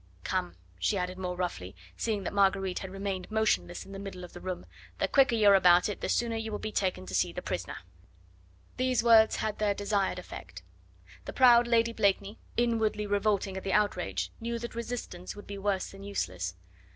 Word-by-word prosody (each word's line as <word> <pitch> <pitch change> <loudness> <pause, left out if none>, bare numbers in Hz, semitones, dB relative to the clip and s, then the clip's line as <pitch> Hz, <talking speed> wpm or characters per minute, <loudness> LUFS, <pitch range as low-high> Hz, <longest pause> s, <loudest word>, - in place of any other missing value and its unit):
Come," 90 0 -2 0.2
she 195 - +1
added 180 0 -3
more 180 -1 -3
roughly, 175 - -4 0.2
seeing 215 -3 -1
that - - -4
Marguerite 195 -2 +2
had 190 - -6
remained 195 -1 -4
motionless 220 -5 0
in 195 - -12
the 195 - -7
middle 195 -2 -7
of 180 - -10
the - - -10
room; 185 -1 -5 0.3
"the - - +1
quicker 270 -4 +4
you 215 -2 +4
are - - +8
about 180 -2 +6
it 205 - -5
the - - -2
sooner 235 -1 +1
you 225 0 -3
will 210 - -2
be 215 - -5
taken 185 - -1
to - - -8
see - - +2
the - - -6
prisoner." - - -4 1.0
These 255 -2 +1
words 225 -2 +6
had 215 -1 -2
their 205 -1 +1
desired 205 -1 0
effect. - - -9 0.6
The - - -6
proud 240 -2 +6
Lady 230 -1 +3
Blakeney, 200 -1 +1 0.2
inwardly 220 -3 +1
revolting 205 -1 0
at 190 - -6
the 195 - -1
outrage, 205 -4 0
knew 235 +1 -3
that 235 +1 -6
resistance 235 -6 -5
would 205 - -10
be 200 -1 -7
worse 195 -1 -1
than 195 - -12
useless. 90 - -3
200 Hz, 200 wpm, -30 LUFS, 185-220 Hz, 1.0 s, are